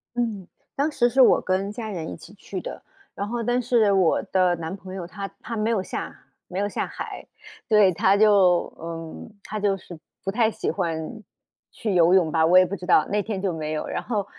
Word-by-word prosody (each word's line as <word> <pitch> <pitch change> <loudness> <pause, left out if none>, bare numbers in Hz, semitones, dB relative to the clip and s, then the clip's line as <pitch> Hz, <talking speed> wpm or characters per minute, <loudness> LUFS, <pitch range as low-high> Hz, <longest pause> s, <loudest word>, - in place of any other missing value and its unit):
嗯， 220 -6 -2 0.3
当 290 +3 0
时 240 -4 +2
是 265 +3 +4
我 250 - +6
跟 190 +2 -1
家 220 +1 -6
人 170 -6 -5
一 - - -6
起 165 +4 -14
去 195 -1 -7
的， - - -8 0.3
然 200 - -3
后 235 +1 -3
但 245 +2 +1
是 235 -4 +3
我 190 -4 +3
的 185 -3 +2
男 165 +1 -5
朋 190 -1 -10
友， 185 -3 -5
他 200 +3 -6
他 235 - -5
没 215 0 0
有 215 -5 +1
下 - - -7 0.2
没 185 - -4
有 205 - +1
下 - - -2
海， - - -7 0.4
对， 210 -4 +5
他 190 +3 +3
就， 200 -4 +4
嗯， 165 +5 -8
他 215 - -5
就 200 -1 +1
是 175 -3 -12 0.2
不 195 - -2
太 220 +1 +2
喜 - - -3
欢 170 +4 -3 0.5
去 215 -3 -3
游 175 0 +5
泳 175 -4 +4
吧， 160 0 +3
我 175 +3 +6
也 185 - +7
不 190 +3 -4
知 180 -2 -9
道， 155 - +4
那 210 +1 +1
天 200 -2 -4
就 190 -3 -1
没 155 -1 -4
有。 155 - -3
然 - - -3
后， 210 -5 -2
195 Hz, 240 characters per minute, -24 LUFS, 175-215 Hz, 0.5 s, 也